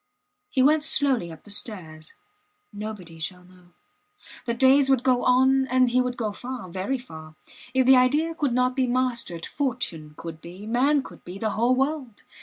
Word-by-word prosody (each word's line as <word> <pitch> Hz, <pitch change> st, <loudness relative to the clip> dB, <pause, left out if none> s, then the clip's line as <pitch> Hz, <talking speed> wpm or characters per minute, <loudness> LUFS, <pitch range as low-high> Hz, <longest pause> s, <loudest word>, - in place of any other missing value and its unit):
He 260 Hz, -, +2 dB
went 305 Hz, +2 st, +4 dB
slowly 270 Hz, -, +2 dB
up 160 Hz, -, -12 dB
the 205 Hz, -, -12 dB
stairs. 160 Hz, -8 st, -6 dB, 0.6 s
Nobody 205 Hz, -6 st, -8 dB
shall 180 Hz, +2 st, -5 dB
know. 180 Hz, -1 st, -21 dB, 0.7 s
The 235 Hz, -, 0 dB
days 265 Hz, +2 st, +4 dB
would 265 Hz, -2 st, +3 dB
go 255 Hz, -2 st, +2 dB
on 265 Hz, +1 st, +4 dB
and 255 Hz, -1 st, +3 dB
he 255 Hz, +1 st, +3 dB
would 250 Hz, -1 st, -3 dB
go 220 Hz, -3 st, -2 dB
far 245 Hz, -2 st, -7 dB
very 190 Hz, +9 st, -2 dB
far. 160 Hz, -10 st, -11 dB, 0.4 s
If 260 Hz, -1 st, +4 dB
the 260 Hz, 0 st, +7 dB
idea 295 Hz, +6 st, +2 dB
could 295 Hz, -5 st, -1 dB
not 250 Hz, +1 st, +1 dB
be 260 Hz, -2 st, +1 dB
mastered, 240 Hz, -9 st, -1 dB
fortune 225 Hz, -, -3 dB
could 165 Hz, -1 st, -8 dB
be, 180 Hz, +4 st, -10 dB
man 265 Hz, +5 st, +2 dB
could -, -, -13 dB
be 180 Hz, +2 st, -8 dB
the 215 Hz, +1 st, -1 dB
whole 240 Hz, +4 st, +2 dB
world. 270 Hz, -4 st, -2 dB
245 Hz, 180 wpm, -25 LUFS, 185-265 Hz, 0.7 s, the